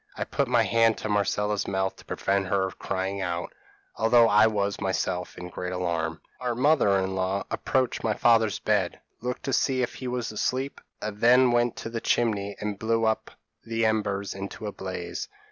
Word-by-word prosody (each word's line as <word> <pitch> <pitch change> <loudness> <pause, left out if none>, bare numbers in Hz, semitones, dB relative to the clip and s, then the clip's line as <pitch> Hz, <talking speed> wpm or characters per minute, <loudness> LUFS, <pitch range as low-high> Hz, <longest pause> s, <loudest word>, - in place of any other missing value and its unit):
I - - -1
put 140 - -1
my 120 -2 +4
hand 115 -1 +3
to 110 - -4
Marcella's 105 0 0
mouth 95 0 -1
to - - -15
prevent 100 0 0
her 95 0 +1
crying 95 +1 -3
out, 85 -2 -3 0.4
although 115 +1 +5
I 105 +1 +6
was 100 -2 -1
myself 90 -2 -2
in 90 - -7
great 90 +1 -5
alarm. 85 -3 -2 0.2
Our 125 -2 -2
mother 130 -6 +4
in 95 0 -1
law 95 +1 -1
approached 130 -1 0
my 110 -2 +1
father's 115 -4 +3
bed, 100 -4 0 0.2
looked 125 +1 -4
to 135 -1 -2
see 130 -2 +2
if - - -2
he 130 - -6
was 125 -2 -2
asleep, 130 +5 -2 0.2
and 105 -1 -4
then 125 +1 +6
went 120 0 +2
to - - -6
the 115 -1 -3
chimney 100 -4 0
and 105 -2 -4
blew 115 0 +1
up 110 0 0 0.3
the 115 0 -1
embers 100 -2 0
into 100 +2 -7
a 105 - -3
blaze. 90 -3 -5
105 Hz, 185 wpm, -26 LUFS, 95-115 Hz, 0.4 s, I